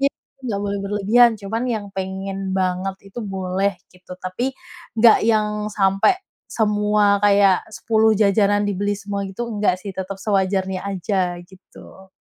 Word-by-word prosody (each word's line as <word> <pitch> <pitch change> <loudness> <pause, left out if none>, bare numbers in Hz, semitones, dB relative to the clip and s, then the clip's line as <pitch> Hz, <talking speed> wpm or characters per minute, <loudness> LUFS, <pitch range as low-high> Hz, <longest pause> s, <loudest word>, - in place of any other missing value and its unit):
Iya 275 - +3 0.3
nggak 225 -7 -3
boleh 200 0 -2
berlebihan, 210 +4 +3
cuman 215 +3 -4
yang 220 -4 -2
pengen 190 0 -4
banget 185 0 -1 0.2
itu 240 - -9
boleh 195 -2 -2 0.2
gitu, 180 0 -12
tapi 240 +9 -3 0.4
nggak 225 -1 +5
yang 210 -1 +1
sampai 195 - +2 0.3
semua 210 -1 +2
kayak 200 -2 +4
10 220 -1 +2
jajanan 205 0 +3
dibeli 205 0 -1
semua 200 -1 -4
gitu, 235 +5 -5
nggak 205 -4 +1
sih, 200 - -5
tetap 190 +1 -5
sewajarnya 190 -1 0
aja 185 -2 -2
gitu. 190 +1 -16
200 Hz, 140 wpm, -21 LUFS, 190-210 Hz, 0.4 s, nggak